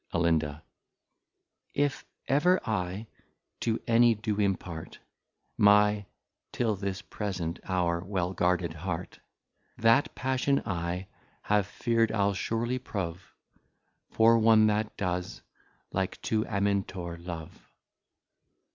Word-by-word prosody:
Alin. 80 Hz, -3 st, +1 dB, 1.1 s
If 145 Hz, -1 st, 0 dB, 0.2 s
ever 175 Hz, +7 st, +4 dB
I 95 Hz, 0 st, -2 dB, 0.5 s
to 115 Hz, -1 st, 0 dB
any 115 Hz, 0 st, +5 dB
do 105 Hz, -1 st, -2 dB
impart, 90 Hz, -5 st, -2 dB, 0.6 s
My, 105 Hz, 0 st, +5 dB, 0.4 s
till 115 Hz, -3 st, 0 dB
this 95 Hz, -1 st, -4 dB
present 90 Hz, -5 st, -4 dB
hour, 85 Hz, -2 st, 0 dB
well 95 Hz, -2 st, -2 dB
guarded 90 Hz, -2 st, +1 dB
Heart, 85 Hz, +1 st, -5 dB, 0.6 s
That 115 Hz, +5 st, +3 dB
Passion 130 Hz, +1 st, +1 dB
I 90 Hz, 0 st, -2 dB, 0.4 s
have 105 Hz, -2 st, +2 dB
fear'd, 115 Hz, -1 st, +1 dB
I'le 100 Hz, -2 st, +2 dB
surely 120 Hz, +5 st, -1 dB
prove, 90 Hz, -6 st, -5 dB, 0.8 s
For 115 Hz, +1 st, +5 dB
one 110 Hz, -1 st, +6 dB
that 105 Hz, 0 st, 0 dB
does, 90 Hz, -2 st, -3 dB, 0.5 s
like 95 Hz, -1 st, -2 dB
to 110 Hz, -1 st, 0 dB
Amintor 100 Hz, -4 st, -1 dB
love. 85 Hz, -3 st, -8 dB
100 Hz, 100 wpm, -29 LUFS, 90-115 Hz, 1.1 s, one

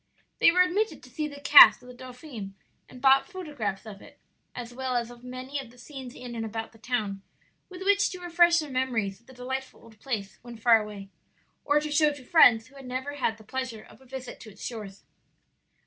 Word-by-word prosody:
They -, -, +6 dB
were 365 Hz, +1 st, +5 dB
admitted 405 Hz, +5 st, -1 dB
to -, -, -15 dB
see 305 Hz, -2 st, -3 dB
the 285 Hz, -1 st, -10 dB
cast 285 Hz, -3 st, +9 dB
of -, -, -15 dB
the 250 Hz, -, -10 dB
dauphin 250 Hz, -5 st, -9 dB, 0.3 s
and 255 Hz, +1 st, -14 dB
bought 270 Hz, +4 st, +5 dB
photographs 285 Hz, -, -5 dB
of 205 Hz, -3 st, -10 dB
it, -, -, -16 dB, 0.4 s
as 245 Hz, -1 st, -7 dB
well 260 Hz, 0 st, -3 dB
as 240 Hz, 0 st, -1 dB
of 240 Hz, 0 st, -15 dB
many 255 Hz, +3 st, -6 dB
of 265 Hz, -3 st, -9 dB
the 245 Hz, -, -19 dB
scenes 260 Hz, -1 st, -10 dB
in 245 Hz, -1 st, -8 dB
and 225 Hz, -1 st, -4 dB
about 225 Hz, 0 st, -5 dB
the 225 Hz, -, -20 dB
town, 215 Hz, -5 st, -3 dB, 0.5 s
with 370 Hz, 0 st, -8 dB
which 405 Hz, +1 st, +3 dB
to 365 Hz, -, -8 dB
refresh 345 Hz, -1 st, +4 dB
their 305 Hz, -4 st, -2 dB
memories 235 Hz, -7 st, -1 dB
of -, -, -33 dB
the 260 Hz, -, -14 dB
delightful 260 Hz, +1 st, -6 dB
old 220 Hz, -2 st, -17 dB
place 215 Hz, -6 st, -5 dB
when 240 Hz, -1 st, -11 dB
far 225 Hz, 0 st, +5 dB
away, 205 Hz, -2 st, -9 dB, 0.5 s
or 295 Hz, 0 st, +3 dB
to 300 Hz, 0 st, -5 dB
show 300 Hz, 0 st, +4 dB
to 275 Hz, -3 st, -13 dB
friends 240 Hz, -7 st, +6 dB
who 275 Hz, +3 st, -18 dB
had 270 Hz, -2 st, -11 dB
never 260 Hz, +3 st, -4 dB
had 225 Hz, -5 st, -1 dB
the 220 Hz, -, -16 dB
pleasure 255 Hz, -1 st, -5 dB
of 230 Hz, -, -18 dB
a -, -, -18 dB
visit 260 Hz, 0 st, -8 dB
to 220 Hz, -, -11 dB
its 205 Hz, 0 st, -11 dB
shores. 210 Hz, -5 st, -7 dB
250 Hz, 225 wpm, -27 LUFS, 225-285 Hz, 0.5 s, cast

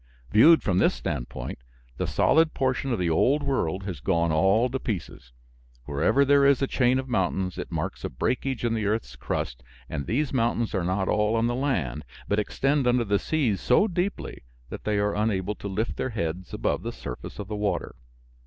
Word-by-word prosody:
Viewed 155 Hz, -, +7 dB
from 95 Hz, -2 st, +1 dB
this -, -, +3 dB
standpoint, -, -, -5 dB, 0.4 s
the -, -, -1 dB
solid 160 Hz, 0 st, +3 dB
portion 130 Hz, 0 st, 0 dB
of 120 Hz, -, +1 dB
the 90 Hz, -3 st, 0 dB
old 140 Hz, -, +3 dB
world 100 Hz, -, -1 dB
has 95 Hz, -4 st, -5 dB
gone 85 Hz, -3 st, +1 dB
all 95 Hz, +10 st, +3 dB
to 130 Hz, +1 st, -3 dB
pieces. 90 Hz, -, -5 dB, 0.5 s
Wherever 80 Hz, -, +2 dB
there 140 Hz, 0 st, +5 dB
is 140 Hz, -2 st, +5 dB
a 135 Hz, -, +1 dB
chain 130 Hz, -1 st, +2 dB
of 130 Hz, 0 st, -3 dB
mountains 95 Hz, -5 st, -1 dB
it -, -, -6 dB
marks -, -, -3 dB
a -, -, -2 dB
breakage 125 Hz, -, -2 dB
in 115 Hz, -, +1 dB
the 110 Hz, -3 st, -1 dB
earth's 110 Hz, +2 st, -2 dB
crust, -, -, -4 dB, 0.3 s
and 70 Hz, -, -4 dB
these 140 Hz, +5 st, 0 dB
mountains 120 Hz, -2 st, 0 dB
are 95 Hz, -4 st, 0 dB
not 95 Hz, +2 st, 0 dB
all 105 Hz, +1 st, +2 dB
on 115 Hz, 0 st, +2 dB
the 120 Hz, -, 0 dB
land, 120 Hz, -, -1 dB, 0.2 s
but 100 Hz, -, +1 dB
extend 135 Hz, +5 st, 0 dB
under 120 Hz, 0 st, +3 dB
the 100 Hz, -2 st, +1 dB
seas 130 Hz, -11 st, 0 dB
so 165 Hz, -, +4 dB
deeply 180 Hz, +1 st, -3 dB, 0.3 s
that -, -, -7 dB
they 105 Hz, -1 st, +1 dB
are 100 Hz, 0 st, +1 dB
unable 105 Hz, -2 st, 0 dB
to 100 Hz, -, -7 dB
lift 105 Hz, +4 st, -2 dB
their 130 Hz, -, -1 dB
heads 90 Hz, -5 st, -4 dB
above -, -, -1 dB
the -, -, -4 dB
surface -, -, -8 dB
of 105 Hz, -, -6 dB
the 105 Hz, -, -4 dB
water. 105 Hz, -1 st, -2 dB
110 Hz, 200 wpm, -26 LUFS, 95-130 Hz, 0.5 s, Viewed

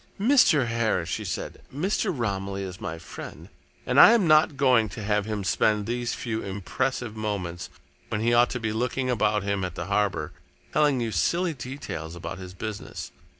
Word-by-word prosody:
"Mr. 210 Hz, -, +5 dB
Harris," 115 Hz, -7 st, 0 dB
she -, -, -2 dB
said, -, -, -5 dB
"Mr. 185 Hz, +9 st, 0 dB
Romilly 100 Hz, -, -2 dB
is 95 Hz, 0 st, -7 dB
my 80 Hz, 0 st, -4 dB
friend, -, -, -10 dB, 0.4 s
and -, -, +3 dB
I 230 Hz, -, +10 dB
am 225 Hz, -6 st, +3 dB
not 155 Hz, -2 st, +5 dB
going 125 Hz, -6 st, +4 dB
to 105 Hz, -, -7 dB
have 105 Hz, 0 st, +1 dB
him 105 Hz, -2 st, -2 dB
spend 105 Hz, +2 st, +2 dB
these 120 Hz, +1 st, -2 dB
few 110 Hz, -2 st, -3 dB
impressive 110 Hz, +4 st, -3 dB
moments, 100 Hz, -6 st, -4 dB, 0.4 s
when 105 Hz, -, -1 dB
he 120 Hz, +1 st, +2 dB
ought 120 Hz, 0 st, +5 dB
to 125 Hz, -, -3 dB
be 110 Hz, -2 st, -2 dB
looking 125 Hz, +3 st, -1 dB
about 105 Hz, -3 st, +1 dB
him 100 Hz, -1 st, -1 dB
at 90 Hz, -2 st, -4 dB
the 85 Hz, -, -4 dB
harbour, 100 Hz, -6 st, 0 dB, 0.4 s
telling 145 Hz, -4 st, +3 dB
you 115 Hz, -1 st, -1 dB
silly 170 Hz, -, +1 dB
details 120 Hz, -, -6 dB
about 85 Hz, +2 st, -6 dB
his 95 Hz, 0 st, -9 dB
business. 110 Hz, +1 st, -6 dB
110 Hz, 180 wpm, -26 LUFS, 100-130 Hz, 0.4 s, I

